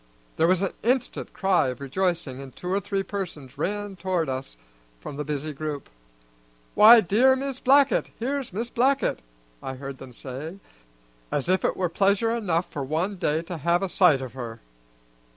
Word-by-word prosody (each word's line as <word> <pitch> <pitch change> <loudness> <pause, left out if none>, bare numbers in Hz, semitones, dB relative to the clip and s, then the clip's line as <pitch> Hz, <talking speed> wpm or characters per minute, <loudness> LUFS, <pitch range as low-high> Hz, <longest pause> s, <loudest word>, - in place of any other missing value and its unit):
There 165 - +4
was 185 +1 +3
an 195 - -1
instant 250 +2 -1
cry 190 -7 +2
of 125 -1 -4
rejoicing, 140 -2 -2
and 135 -2 -11
two 180 - -6
or 195 - +2
three 200 -1 -2
persons 175 -10 -6
ran 205 0 -2
toward 180 -4 -1
us 130 - -5 0.4
from 140 - -8
the 150 - -3
busy 150 +1 -3
group. 145 - -5 0.8
"Why, 225 +2 +9
dear 235 +8 +4
Mis' 270 0 -4
Blackett! 275 +1 +4
here's 270 +2 -2
Mis' 230 +6 -4
Blackett!" 270 +3 +1 0.4
I 130 - -5
heard 135 0 -7
them 130 -1 -10
say, 135 +8 -7 0.7
as 145 +3 -1
if 185 +1 +2
it - - 0
were 185 - +1
pleasure 200 +6 +2
enough 180 -7 0
for 145 - -3
one 165 +8 -1
day 160 -1 0
to 175 0 -6
have 170 +5 +2
a 195 - -1
sight 160 -8 +4
of 125 -3 -8
her. 115 -3 -7
180 Hz, 175 wpm, -25 LUFS, 140-205 Hz, 0.8 s, Why